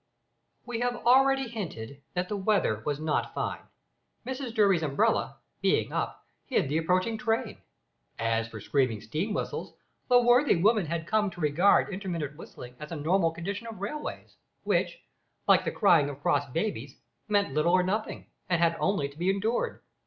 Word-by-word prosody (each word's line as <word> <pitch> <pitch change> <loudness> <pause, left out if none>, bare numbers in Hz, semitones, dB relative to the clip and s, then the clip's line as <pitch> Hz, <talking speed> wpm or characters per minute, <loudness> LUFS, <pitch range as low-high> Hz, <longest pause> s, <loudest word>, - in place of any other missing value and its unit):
We 240 -2 -4
have 245 0 0
already 270 +1 +5
hinted 145 - -6
that 180 0 -1
the 210 - -3
weather 195 - +1
was 145 -1 -1
not 155 0 -1
fine. - - -3 0.6
Mrs 260 -1 -4
Durby's 200 -6 +3
umbrella 145 -3 +1 0.2
being - - +1
up, - - -3 0.2
hid - - +1
the 155 +3 +1
approaching 185 +7 0
train. 225 -2 -1 0.6
As 115 0 0
for 110 -1 -9
screaming 125 0 0
steam 155 - -3
whistles, - - -4 0.4
the 245 0 +7
worthy 245 +3 +4
woman 205 +1 +3
had 160 0 -3
come 210 +1 +1
to 185 - -12
regard 175 +6 +3
intermittent 170 -7 -4
whistling 125 -5 -11
as 150 +1 -8
a - - -3
normal 165 +3 +2
condition 195 +7 -5
of 225 -4 -8
railways, 215 +10 -6 0.3
which, - - 0 0.4
like - - +5
the - - 0
crying 170 -9 +4
of 140 -1 -8
cross 145 -1 +1
babies, 145 - -3 0.3
meant 205 -8 +1
little 155 +4 +2
or 185 0 +5
nothing, 210 +4 -2 0.2
and 175 -2 +2
had 170 -1 +3
only 195 -8 +1
to 140 +2 -15
be 180 +2 +1
endured. 205 +5 -1
180 Hz, 165 wpm, -28 LUFS, 150-215 Hz, 0.6 s, the